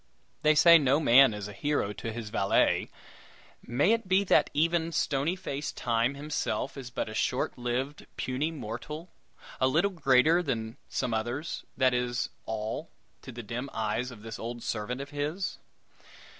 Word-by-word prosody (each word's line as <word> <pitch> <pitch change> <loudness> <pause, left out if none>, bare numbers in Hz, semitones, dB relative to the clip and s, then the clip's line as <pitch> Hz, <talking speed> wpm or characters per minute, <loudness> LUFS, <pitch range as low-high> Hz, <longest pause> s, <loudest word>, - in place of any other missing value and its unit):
They 155 0 +4
say 170 +2 +8
no 140 0 +3
man 135 -3 +7
is 105 -1 -5
a 105 - -9
hero 140 -3 -1
to 115 - -5
his 110 -2 -6
valet; 100 -3 +2 0.7
may 140 - +2
it 230 -4 -1
be 190 +2 +4
that 195 - +4
even 165 +2 +1
stony 150 +2 0
face 150 -6 -4
Time 120 +3 0
himself 140 -4 -2
is 135 -3 -7
but 120 - -3
a 110 - -7
short 125 +3 0
lived, 125 +4 -3
puny 130 +5 -1
mortal 150 +4 -7 0.5
a 130 - +4
little 170 +9 +2
greater 155 0 +4
than 115 -7 -3
some 125 -3 -1
others, 120 +8 -3
that 130 -2 +4
is 125 -1 -1 0.2
all 110 +8 -4 0.3
to 130 - -9
the 120 0 -8
dim 120 +5 -5
eyes 110 +3 -1
of 115 -4 -12
this 115 -1 -7
old 120 +1 -5
servant 120 +4 -3
of 140 +2 -8
his? 150 +6 -3
130 Hz, 165 wpm, -29 LUFS, 115-150 Hz, 0.7 s, say